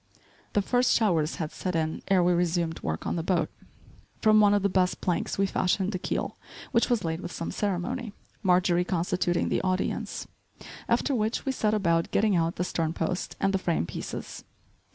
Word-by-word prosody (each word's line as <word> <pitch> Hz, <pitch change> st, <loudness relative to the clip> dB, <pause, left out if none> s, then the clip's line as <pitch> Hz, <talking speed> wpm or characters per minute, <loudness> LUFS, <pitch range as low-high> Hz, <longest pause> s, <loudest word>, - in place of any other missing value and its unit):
The 205 Hz, -, +2 dB
first 245 Hz, +4 st, +3 dB
showers 170 Hz, -9 st, +2 dB
had 155 Hz, -2 st, -4 dB
set 180 Hz, -2 st, -3 dB
in 160 Hz, -1 st, -1 dB
ere 190 Hz, -2 st, +4 dB
we 175 Hz, 0 st, +4 dB
resumed 170 Hz, -1 st, 0 dB
work 80 Hz, 0 st, -3 dB
on -, -, -1 dB
the -, -, 0 dB
boat. 165 Hz, -2 st, 0 dB, 0.7 s
From 215 Hz, -1 st, +5 dB
one 205 Hz, -1 st, +5 dB
of 205 Hz, -, +1 dB
the -, -, +4 dB
best 185 Hz, -1 st, +1 dB
planks 175 Hz, -2 st, -1 dB
we 195 Hz, -, +3 dB
fashioned 190 Hz, +1 st, 0 dB
the 185 Hz, -, -3 dB
keel, -, -, -3 dB, 0.3 s
which 230 Hz, -2 st, +2 dB
was 240 Hz, -5 st, +1 dB
laid 165 Hz, +1 st, -2 dB
with 175 Hz, -, -6 dB
some 165 Hz, -, -4 dB
ceremony, 205 Hz, +4 st, -2 dB, 0.3 s
Marjorie 180 Hz, -2 st, +3 dB
constituting 180 Hz, 0 st, 0 dB
the -, -, +1 dB
audience; 185 Hz, 0 st, -2 dB, 0.6 s
after 285 Hz, -, +2 dB
which 220 Hz, -2 st, -1 dB
we 270 Hz, -, +1 dB
set 215 Hz, -4 st, +1 dB
about 170 Hz, -5 st, +1 dB
getting 210 Hz, -1 st, +2 dB
out 165 Hz, 0 st, +1 dB
the 180 Hz, -, -1 dB
stern 165 Hz, -2 st, -1 dB
post 170 Hz, +3 st, -2 dB
and 195 Hz, 0 st, +1 dB
the 195 Hz, -, +2 dB
frame 170 Hz, -, 0 dB
pieces. -, -, -6 dB
180 Hz, 190 wpm, -27 LUFS, 170-205 Hz, 0.7 s, From